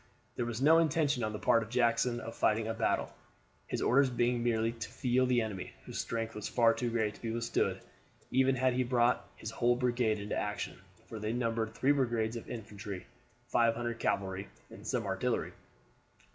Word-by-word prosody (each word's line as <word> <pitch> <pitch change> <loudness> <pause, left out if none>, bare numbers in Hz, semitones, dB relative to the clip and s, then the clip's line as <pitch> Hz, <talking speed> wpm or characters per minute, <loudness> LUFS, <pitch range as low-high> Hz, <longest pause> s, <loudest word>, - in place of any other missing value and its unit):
There 120 - -2
was 120 +2 -3
no 160 +3 +7
intention 150 -5 +2
on 110 - -1
the 105 - -4
part 115 +2 +3
of 110 - -6
Jackson 120 0 +2
of 115 0 -7
fighting 110 +1 +2
a 115 - -1
battle, 115 0 0 0.5
his - - -2
orders 135 +2 +4
being 120 0 +1
merely 115 -1 +1
to 115 -2 -7
feel 130 +1 +1
the 125 -1 +3
enemy; 100 -4 -5
whose - - -5
strength 115 0 -3
was 105 - -5
far 115 -2 +4
too 120 +1 -2
great 110 -2 0
to - - -16
be 115 - -3
withstood 115 +1 0 0.5
even 130 +1 +3
had 130 0 +2
he 130 +1 +1
brought 120 0 +2
his 110 - -6
whole 120 +1 +2
brigade 120 -3 +1
into 100 0 -4
action, 105 0 -3 0.3
for 110 - -7
they 105 +1 -2
numbered 115 -2 -1
three 135 - +3
brigades 120 -5 +1
of 115 - -7
infantry, 105 -4 -7 0.4
500 115 0 +1
cavalry, 95 0 -1 0.2
and - - -10
some - - -1
artillery. - - -1
115 Hz, 185 wpm, -32 LUFS, 110-125 Hz, 0.5 s, no